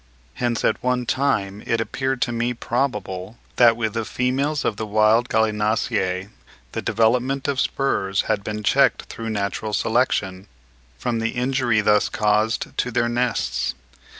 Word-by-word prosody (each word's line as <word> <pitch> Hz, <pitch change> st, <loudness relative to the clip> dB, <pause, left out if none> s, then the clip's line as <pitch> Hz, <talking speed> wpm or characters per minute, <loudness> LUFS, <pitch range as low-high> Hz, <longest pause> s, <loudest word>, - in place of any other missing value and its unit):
Hence 120 Hz, -2 st, -1 dB
at -, -, +1 dB
one 125 Hz, -1 st, 0 dB
time 105 Hz, -7 st, 0 dB
it 115 Hz, -, +1 dB
appeared 130 Hz, +2 st, -1 dB
to 120 Hz, -, -2 dB
me 120 Hz, +1 st, -1 dB
probable 110 Hz, -5 st, -3 dB, 0.2 s
that 115 Hz, -2 st, +6 dB
with 110 Hz, -2 st, -1 dB
the 115 Hz, -1 st, -1 dB
females 135 Hz, +6 st, -1 dB
of 110 Hz, -, 0 dB
the 110 Hz, -, -4 dB
wild 110 Hz, +3 st, +3 dB
Gallinaceae 105 Hz, -3 st, 0 dB, 0.4 s
the -, -, -3 dB
development 125 Hz, +5 st, +1 dB
of 140 Hz, -2 st, 0 dB
spurs 100 Hz, -10 st, 0 dB
had 100 Hz, -2 st, -1 dB
been 105 Hz, +1 st, -4 dB
checked -, -, +3 dB
through 115 Hz, 0 st, -7 dB
natural 105 Hz, 0 st, -2 dB
selection, 105 Hz, -5 st, 0 dB, 0.5 s
from 115 Hz, -, -2 dB
the 115 Hz, 0 st, -1 dB
injury 125 Hz, -3 st, +1 dB
thus 105 Hz, 0 st, +3 dB
caused 105 Hz, +1 st, 0 dB
to -, -, 0 dB
their 120 Hz, 0 st, +1 dB
nests. 120 Hz, -, -1 dB
115 Hz, 150 wpm, -22 LUFS, 105-125 Hz, 0.5 s, that